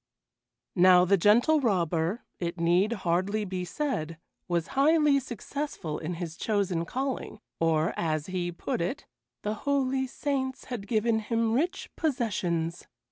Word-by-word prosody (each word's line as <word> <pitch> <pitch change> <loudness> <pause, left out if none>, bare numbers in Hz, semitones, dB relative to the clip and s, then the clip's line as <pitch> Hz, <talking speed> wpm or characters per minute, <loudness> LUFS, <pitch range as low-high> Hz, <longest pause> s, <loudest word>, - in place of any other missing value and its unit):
Now 180 -1 +6
the 200 +2 +4
Gentle 235 - +4
Robber, 180 - 0 0.2
it 170 0 -3
need 175 +5 +3
hardly 195 +1 0
be 185 -1 -3
said, 175 - -3 0.3
was 170 -2 -1
highly 295 0 +4
successful 250 - -5
in 170 +2 -4
his 170 -1 -6
chosen 195 -6 0
calling, 260 +1 -3 0.2
or, 165 -1 +2
as 155 -2 -1
he 180 -1 -2
put 170 - -3
it, 180 +11 -3 0.4
"the 210 - -1
holy 265 +2 0
saints 265 0 -2
had 230 -6 -6
given 220 +1 +2
him 225 +1 0
rich 330 +9 -1
possessions." 185 - -1
200 Hz, 135 wpm, -28 LUFS, 170-255 Hz, 0.4 s, Now